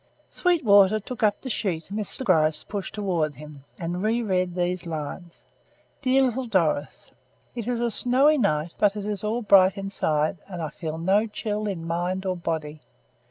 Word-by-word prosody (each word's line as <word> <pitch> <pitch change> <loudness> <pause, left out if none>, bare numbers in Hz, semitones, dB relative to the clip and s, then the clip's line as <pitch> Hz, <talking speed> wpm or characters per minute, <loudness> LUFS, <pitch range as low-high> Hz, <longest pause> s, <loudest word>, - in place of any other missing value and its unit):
Sweetwater 215 - +4
took 245 +4 -8
up 210 -2 +2
the 260 - -6
sheet 180 -7 -2
Mr. 215 +5 -2
Gryce 155 -7 +2
pushed 200 -2 -5
towards 175 -8 -1
him 150 -2 -12
and 175 +1 -3
re 225 +3 +1
read 185 -4 0
these 180 -1 -1
lines: 165 +2 -6 0.6
"Dear 270 0 +3
Little 255 0 -1
Doris: 165 -8 -1 0.4
"It 235 -2 -5
is 245 -1 -1
a 235 -1 0
snowy 275 +7 +3
night, 165 -6 0
but 205 -1 +3
it 205 -1 -5
is 210 -1 -3
all 225 +3 -1
bright 195 -1 +5
inside 160 -5 -1
and 180 -3 -7
I 160 -2 -3
feel 160 0 -6
no 195 +6 +2
chill 210 0 -3
in 175 -5 -4
mind 175 +3 -2
or 185 -1 0
body. 155 -3 -4
190 Hz, 170 wpm, -25 LUFS, 165-215 Hz, 0.6 s, bright